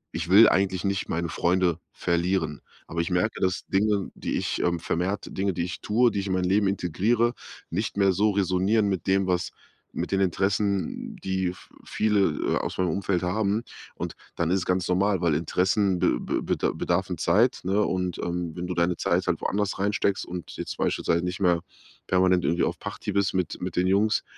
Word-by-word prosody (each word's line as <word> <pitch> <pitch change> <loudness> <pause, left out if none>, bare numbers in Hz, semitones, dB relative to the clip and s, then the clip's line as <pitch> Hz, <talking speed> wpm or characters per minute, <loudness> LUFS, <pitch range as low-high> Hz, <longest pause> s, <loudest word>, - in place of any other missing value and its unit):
„Ich 85 +1 -3
will 105 +4 +8
eigentlich 95 -1 +1
nicht 100 -1 -1
meine 85 +1 -1
Freunde 85 0 +1
verlieren“, 85 -3 -1 0.3
aber 85 +1 -2
ich 85 - -3
merke, 90 +5 0
dass 95 -1 0
Dinge, 100 0 +1
die - - -3
ich, - - -2
ähm 85 -1 +1
vermehrt 95 +6 -2
Dinge, 95 0 0
die 85 - -2
ich 90 - -5
tue, 115 +2 +3
die 100 - -2
ich 100 - -3
in 95 - -1
mein 90 -1 0
Leben 100 +2 +2
integriere, 105 +6 +1 0.4
nicht 100 +4 -2
mehr 100 -1 +4
so 105 +3 +2
resonieren 100 +2 +2
mit 95 -3 -3
dem, 95 0 +3
was 90 -1 0 0.5
mit - - -3
den 95 0 +2
Interessen, 100 +2 0
die 95 -1 -1
v - - -18
viele, 105 -1 +1 0.4
äh, - - +2
aus - - -3
meinem 90 -2 +2
Umfeld 95 +1 0
haben. 100 +4 0 0.3
Und - - -5 0.2
dann 85 -1 0
ist 95 - +3
es - - -4
ganz 90 -1 0
normal, 95 0 +1
weil 85 -4 +2
Interessen 95 +3 +1
be - - +2
be - - -2
beda - - 0
bedarfen 90 0 -1
Zeit, 110 +11 +3
ne? 95 +3 +1
Und, 90 -2 -1
ähm, 85 -1 -3
wenn 90 0 -4
du 90 - -2
deine 85 0 +1
Zeit - - 0
halt - - +1
woanders 100 -1 -1
reinsteckst 100 -1 0
und 90 -1 -7
jetzt - - -5
beispielsweise 85 +1 0
nicht 90 +1 -3
mehr 90 -3 +3 0.5
permanent 90 -1 +3
irgendwie 85 - +1
auf - - -1
Party 105 - -5
bist 100 -1 +1
mit 90 - -2
mit 90 - -4
den 90 - +2
Jungs, 105 +3 +2
95 Hz, 200 wpm, -26 LUFS, 90-100 Hz, 0.5 s, will